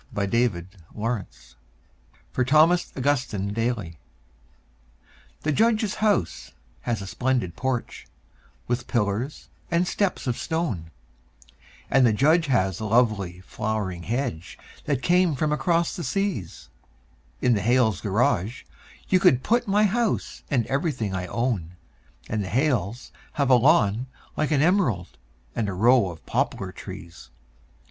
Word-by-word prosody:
The 105 - -3
Snowman 110 -5 +1
in - - -17 0.3
the - - -9
Yard 115 -3 -1 1.0
(For 130 - +1
Thomas 155 +7 +4
Augustine 125 -8 0
Daly) 110 -8 -2 1.4
The 155 - 0
Judge's 220 +3 +2
house 205 - 0 0.3
has 110 - -2
a - - -6
splendid 120 -3 -1
porch, 130 -2 -3 0.6
with 120 +1 -2
pillars 115 +5 -2 0.2
and 170 +1 +1
steps 200 -1 -1
of 125 -2 -2
stone, 155 - -2 1.0
And 135 0 +4
the 115 -3 +4
Judge 155 +8 +3
has 95 -9 +1
a 110 - -4
lovely 105 -6 +1
flowering 105 -3 -3
hedge 110 -4 -3 0.3
that 140 -4 -1
came 175 0 +3
from 150 +3 0
across 165 +3 +1
the 175 - -5
seas; 195 - -3 0.7
In 125 - +3
the 105 - 0
Hales' 110 -2 +2
garage 105 +1 0 0.4
you 185 - +4
could 130 -9 +4
put 240 +1 +1
my 205 +2 +3
house 220 +2 0
and 125 -6 +1
everything 135 - -1
I 90 -1 -3
own, 100 -7 -2 0.5
And 110 -2 -2
the 95 - -5
Hales 125 - 0 0.2
have 140 -2 +1
a - - +8
lawn 120 -3 +3 0.3
like 155 - 0
an 145 -2 +3
emerald 135 - +1 0.4
and 105 -3 -1
a - - -3
row 115 +1 +4
of 85 -3 -11
poplar - - -1
trees. 85 +1 -10
125 Hz, 140 wpm, -25 LUFS, 100-155 Hz, 1.4 s, a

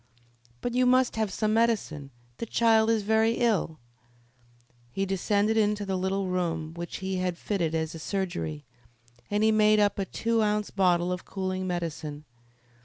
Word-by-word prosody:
"But 245 - -2
you 250 0 +3
must 255 0 +3
have 220 -3 -1
some 215 +2 0
medicine. 215 -11 0 0.3
The 230 - -5
child 225 -1 +3
is 225 -2 +2
very 220 +2 +3
ill." 220 -10 0 1.1
He 195 +11 -2
descended 205 +3 +1
into 210 -1 +1
the 190 -1 -2
little 190 +1 -1
room 165 -3 -2
which 170 0 -6
he 190 0 -1
had 180 -1 -1
fitted 170 -6 -1
as 160 0 -2
a 165 - -8
surgery, 170 -5 -3 0.6
and 205 +1 +1
he 220 - +5
made 215 0 +4
up 205 -1 +2
a 195 - 0
two 230 +3 0
ounce 210 -1 0
bottle 180 -2 +2
of 180 0 -3
cooling 185 -1 -3
medicine. 160 -4 -4
195 Hz, 165 wpm, -27 LUFS, 175-220 Hz, 1.1 s, he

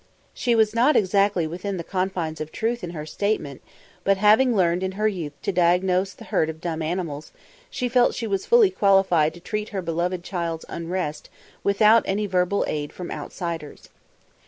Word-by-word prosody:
She 240 -2 +1
was 220 -1 +3
not 250 +6 +3
exactly 195 -2 +2
within 185 +5 -4
the 170 - -4
confines 185 -4 -3
of 155 0 -5
truth 235 -1 -2
in 175 - -4
her 155 -3 -6
statement, 155 -6 -2 0.4
but 195 +1 +3
having 220 +5 +4
learned 175 -2 +2
in 190 0 -2
her 215 +2 0
youth 170 -8 -3
to - - 0
diagnose 180 +2 +2
the - - -13
hurt 160 - 0
of 160 0 -7
dumb 165 -1 -3
animals, 155 -3 -4 0.4
she 250 - -2
felt 245 0 +3
she 230 - -3
was 195 -3 -2
fully 460 -5 +5
qualified 190 - +3
to - - -11
treat 210 +4 -4
her 195 -3 -3
beloved 175 +2 -2
child's 170 -3 -4
unrest 170 -2 -4 0.3
without 215 +3 +5
any 205 +2 0
verbal 185 0 +1
aid 145 -1 -3
from 180 - -7
outsiders. 165 -4 -6
185 Hz, 180 wpm, -24 LUFS, 170-210 Hz, 0.4 s, fully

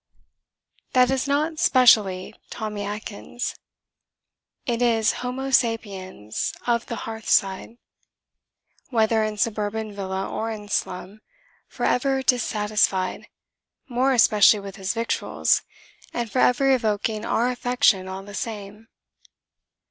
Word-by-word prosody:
That 255 0 +4
is 270 +1 0
not 305 +3 0
specially 210 -8 +4 0.2
Tommy 210 -2 -5
Atkins; 210 +3 -5 1.1
it 240 -2 -1
is 225 -3 +3
homo 260 +2 -3
sapiens 195 - -1
of 235 -1 0
the 235 - -4
hearthside, 220 -1 0 1.1
whether 220 -2 +2
in 215 -1 -3
suburban 215 -1 -2
villa 190 -1 -3
or 225 - -3
in 210 -2 -7
slum, 195 +1 -3 0.5
for - - -4
ever 265 +1 +1
dissatisfied 210 -6 +1 0.6
(more 255 +2 +1
especially 215 -4 +5
with 195 0 -9
his 195 +2 -2
victuals) 230 0 +1 0.5
and 235 -3 -3
for 255 - 0
ever 270 +2 +4
evoking 215 -3 0
our 240 +2 +1
affection 245 -6 +2
all 190 +1 -6
the 205 +1 -11
same. 210 0 -6
220 Hz, 110 wpm, -24 LUFS, 205-245 Hz, 1.1 s, especially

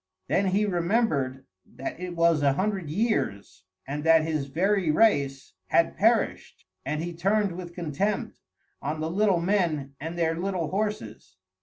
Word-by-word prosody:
Then 195 +1 +1
he 200 +3 +2
remembered 170 - 0 0.2
that 135 - -7
it 180 -1 -5
was 165 -2 +3
a 140 -1 +3
hundred 190 -1 -2
years, 155 - -2 0.2
and 145 +2 -4
that 165 -1 +5
his 155 -3 -2
very 185 +4 +1
race 140 -8 +2
had - - +2
perished, - - +1 0.2
and 155 +1 -2
he 175 0 -4
turned 195 +4 +1
with 175 0 -8
contempt 175 +5 -2 0.4
on 150 +2 -3
the 160 +1 -2
little 195 -1 +2
men 170 -7 0
and 165 +3 -5
their 165 -1 +1
little 180 -2 -2
horses. 190 - -4
170 Hz, 150 wpm, -26 LUFS, 150-195 Hz, 0.4 s, that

